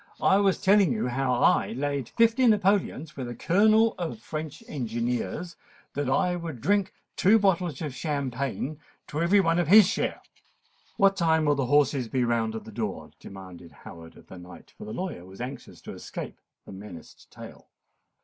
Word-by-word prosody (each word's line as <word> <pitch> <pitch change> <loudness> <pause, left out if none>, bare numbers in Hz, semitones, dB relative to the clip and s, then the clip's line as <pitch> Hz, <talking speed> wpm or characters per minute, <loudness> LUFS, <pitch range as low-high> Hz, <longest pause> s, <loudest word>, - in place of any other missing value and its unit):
"I 190 - +5
was 200 -2 +2
telling 200 -1 +4
you 215 - -1
how 130 +1 -1
I 120 - +2
laid 140 -1 -3
fifty 230 +2 +3
napoleons 195 - +1
with 130 -3 -5
a 120 - -6
Colonel 220 - +3
of 160 -11 -4
French 155 - -7
engineers 125 +6 -3 0.4
that 140 -2 -2
I 180 +6 +1
would 165 -7 -6
drink 200 - +1 0.2
two 205 +4 +5
bottles 180 -7 0
of 150 -4 -4
champagne 140 0 -3 0.3
to 150 - -4
every 185 +4 +4
one 165 -2 +2
of 175 - 0
his 205 +3 +8
share——" 215 - -2 0.7
"What 195 0 +4
time 160 -2 +2
will 145 - +3
the 135 -3 -1
horses 140 -2 +2
be 125 +2 0
round 115 -2 0
at 110 - -6
the - - -11
door?" 100 -9 -5
demanded 95 -3 -11
Howard 80 0 -12
of - - -17
the 95 - -12
knight; 90 +1 -14
for 215 - -10
the 215 - -7
lawyer 180 - -5
was 95 +1 -14
anxious 125 +3 -8
to - - -9
escape - - -8 0.2
the - - -11
menaced 95 -4 -12
tale. - - -13
145 Hz, 180 wpm, -26 LUFS, 120-190 Hz, 0.7 s, his